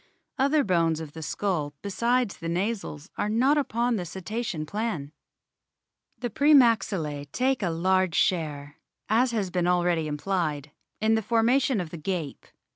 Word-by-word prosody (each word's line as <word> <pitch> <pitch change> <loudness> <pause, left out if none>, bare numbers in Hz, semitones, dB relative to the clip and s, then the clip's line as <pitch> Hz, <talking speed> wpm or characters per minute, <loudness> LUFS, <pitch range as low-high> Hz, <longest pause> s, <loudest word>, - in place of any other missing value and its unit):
Other 280 +2 +3
bones 165 -4 +1
of 160 -3 -7
the 160 - -8
skull 155 -4 -2
besides 235 +3 0
the 165 - -5
nasals 185 -3 -3
are 210 - 0
not 255 +7 +3
upon 240 -3 0
the 180 - -3
Cetacean 190 0 -4
plan. 185 -6 -3 1.1
The 240 -2 -4
pre 295 +7 +5
maxillae 190 - +2
take 260 - +1
a 185 - 0
large 185 +1 +1
share, 150 -4 -1 0.3
as 240 +4 +3
has 210 -6 -2
been 175 -1 0
already 175 -3 +2
implied, 150 -2 -2 0.3
in 220 +1 +3
the 220 - +2
formation 235 +3 +2
of 170 -3 -4
the 170 - -6
gape. 165 -3 -4
190 Hz, 150 wpm, -26 LUFS, 160-230 Hz, 1.1 s, pre